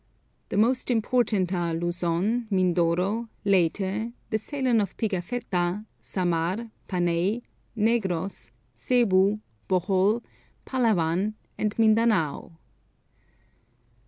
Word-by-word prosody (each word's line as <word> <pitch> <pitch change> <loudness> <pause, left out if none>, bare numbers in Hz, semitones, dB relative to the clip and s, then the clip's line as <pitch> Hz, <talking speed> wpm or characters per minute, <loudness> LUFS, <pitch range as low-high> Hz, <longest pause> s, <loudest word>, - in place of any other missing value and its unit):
The - - -2
most 245 +5 +2
important 220 -5 +1
are 170 -2 -1
Luzon, 175 +7 -1
Mindoro, 185 +4 +1 0.2
Leyte, 195 +4 +1 0.2
the 220 - +2
Ceylon 255 -2 +1
of 195 -2 -4
Pigafetta, 190 -2 -2
Samar, 180 +5 -1 0.2
Panay, 180 +5 0 0.3
Negros, 200 -5 0 0.3
Zebu, 210 -5 +3 0.3
Bohol, 190 +4 +2 0.4
Palawan, 210 -5 +1 0.2
and 210 0 -1
Mindanao. 215 -8 +2
200 Hz, 80 wpm, -26 LUFS, 175-225 Hz, 0.4 s, Zebu